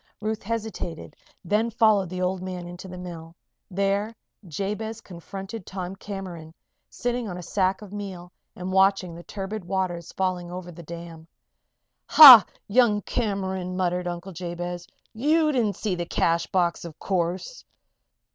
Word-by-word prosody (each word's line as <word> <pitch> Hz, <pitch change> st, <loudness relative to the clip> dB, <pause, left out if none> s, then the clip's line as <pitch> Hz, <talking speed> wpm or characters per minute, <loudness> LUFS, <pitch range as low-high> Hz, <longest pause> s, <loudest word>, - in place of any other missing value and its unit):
Ruth 215 Hz, 0 st, -3 dB
hesitated, 220 Hz, -6 st, -5 dB, 0.3 s
then 210 Hz, +6 st, +1 dB
followed 215 Hz, -5 st, +3 dB
the 185 Hz, +1 st, -3 dB
old 180 Hz, 0 st, -1 dB
man 185 Hz, -1 st, -5 dB
into 175 Hz, +2 st, -9 dB
the 180 Hz, 0 st, -8 dB
mill. 170 Hz, -2 st, -9 dB, 0.3 s
There 200 Hz, +3 st, 0 dB, 0.3 s
Jabez 210 Hz, +6 st, -4 dB
confronted 195 Hz, +2 st, -8 dB
Tom 185 Hz, 0 st, -6 dB
Cameron, 185 Hz, -5 st, -8 dB, 0.3 s
sitting 245 Hz, -2 st, -3 dB
on 180 Hz, -, -5 dB
a 180 Hz, -, -7 dB
sack 190 Hz, +3 st, 0 dB
of 205 Hz, -1 st, -11 dB
meal 190 Hz, -4 st, -7 dB, 0.2 s
and 180 Hz, +1 st, -5 dB
watching 190 Hz, -2 st, +3 dB
the 170 Hz, -, -9 dB
turbid 200 Hz, +3 st, -6 dB
waters 175 Hz, -2 st, -2 dB
falling 185 Hz, -2 st, -2 dB
over 180 Hz, 0 st, -7 dB
the 170 Hz, 0 st, -11 dB
dam. 170 Hz, 0 st, -9 dB, 0.8 s
"Ha! 260 Hz, -9 st, +12 dB, 0.2 s
Young 210 Hz, -2 st, +3 dB
Cameron," 190 Hz, -5 st, -2 dB
muttered 180 Hz, -1 st, 0 dB
Uncle 175 Hz, +2 st, -5 dB
Jabez. 175 Hz, 0 st, -5 dB, 0.3 s
"You 305 Hz, +6 st, +2 dB
didn't 225 Hz, -8 st, +1 dB
see 210 Hz, 0 st, -2 dB
the 175 Hz, -1 st, -3 dB
cash 170 Hz, 0 st, +1 dB
box, 175 Hz, -2 st, 0 dB
of 170 Hz, -3 st, -9 dB
course?" 185 Hz, -, -2 dB
185 Hz, 145 wpm, -25 LUFS, 175-210 Hz, 0.8 s, Ha